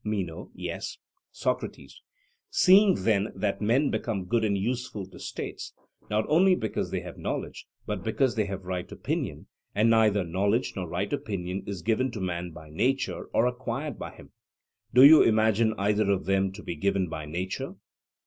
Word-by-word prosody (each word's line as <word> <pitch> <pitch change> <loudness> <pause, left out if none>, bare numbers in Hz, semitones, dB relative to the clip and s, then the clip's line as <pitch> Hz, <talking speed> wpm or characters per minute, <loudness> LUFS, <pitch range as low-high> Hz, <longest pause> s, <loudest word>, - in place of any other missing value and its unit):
MENO: 95 -7 -3
Yes. - - -5 0.3
SOCRATES: - - -4 0.5
Seeing 190 +1 +6
then 105 -2 +2
that 105 0 -1
men 125 +7 +2
become 100 -6 -2
good 115 +3 +1
and 100 -2 +1
useful 115 -1 -3
to 95 - -14
states, - - -6 0.3
not 105 +1 +1
only 185 +5 +5
because 110 - -2
they - - -2
have - - -9
knowledge, - - -4 0.2
but 105 -4 -4
because 120 +3 +1
they 110 -2 0
have 95 -1 -6
right 90 -1 -4
opinion, - - -3 0.3
and 110 +3 +4
that - - +5
neither 105 -3 +3
knowledge 100 +8 0
nor 90 -3 -4
right 95 +4 -2
opinion 95 -2 -3
is 95 -4 -5
given 115 +4 +1
to 110 - -5
man 90 -2 -3
by 80 -2 -12
nature 130 - 0
or 115 - +1
acquired 130 +2 -3
by - - -5
him - - -15 0.6
(do 125 +2 +7
you 150 +3 +10
imagine 110 0 +3
either 105 +1 +1
of 100 -2 +1
them 95 0 +1
to 105 - -10
be 85 - -4
given 95 +3 0
by 80 -2 -6
nature? 90 +4 -4
105 Hz, 175 wpm, -27 LUFS, 95-115 Hz, 0.6 s, you